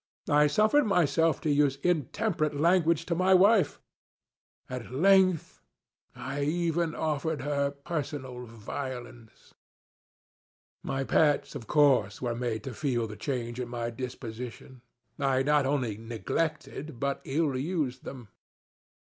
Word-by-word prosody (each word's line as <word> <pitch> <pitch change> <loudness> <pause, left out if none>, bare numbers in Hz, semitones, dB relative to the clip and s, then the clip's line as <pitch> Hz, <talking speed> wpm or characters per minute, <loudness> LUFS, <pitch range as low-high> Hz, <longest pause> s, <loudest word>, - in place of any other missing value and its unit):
I 150 +1 +5
suffered 215 - +3
myself 165 -4 +2
to 155 - 0
use 145 -2 +3
intemperate 160 - 0
language 165 -1 +3
to 170 - -1
my 185 +2 +4
wife. 200 +2 +4 0.9
At 125 -2 -6
length, 185 +3 +3 0.5
I 145 - -4
even 165 +1 0
offered 155 0 -1
her 140 -1 0
personal 140 -4 -5
violence. 120 0 -8 1.3
My 135 0 -2
pets, 145 +3 +2
of 115 - -8
course, 135 -9 +3
were 120 -2 -2
made 115 -2 -3
to 130 - -6
feel 120 -3 -1
the 105 -1 -7
change 120 +1 -4
in 125 -1 -4
my 120 -1 -3
disposition. 125 0 -7 0.4
I 135 -1 +2
not 145 -1 +3
only 125 -7 -1
neglected, 135 +4 -3
but 140 +1 -1
ill 145 0 0
used 135 -3 -2
them. 125 -6 -9
140 Hz, 120 wpm, -28 LUFS, 125-160 Hz, 1.3 s, I